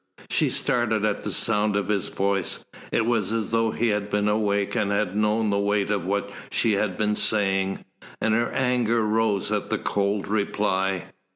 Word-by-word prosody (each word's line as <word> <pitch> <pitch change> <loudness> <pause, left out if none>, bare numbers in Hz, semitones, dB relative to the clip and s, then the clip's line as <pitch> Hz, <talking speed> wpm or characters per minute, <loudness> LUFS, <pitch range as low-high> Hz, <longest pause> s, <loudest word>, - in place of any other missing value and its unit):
She - - +2
started 110 -3 +1
at 105 -1 -1
the - - -3
sound 105 -2 +1
of 100 - 0
his 100 -3 -1
voice. 100 -2 -1 0.3
It 115 - +1
was 115 -4 +1
as 110 -2 -2
though 115 0 +2
he 115 +1 0
had 105 -1 -1
been 105 0 +1
awake 100 -1 +1
and 100 - +1
had 100 -2 0
known 105 0 +1
the 100 - +1
weight 100 0 +1
of 100 -4 -1
what 100 +1 -1 0.2
she 115 - +2
had 100 -2 0
been 105 -1 +1
saying, 95 -3 +1 0.3
and 110 - +1
her 120 +2 +1
anger 120 -3 +1
rose 105 -2 +1
at - - -1
the - - 0
cold 100 0 -1
reply. 95 -2 0
105 Hz, 185 wpm, -25 LUFS, 100-110 Hz, 0.3 s, She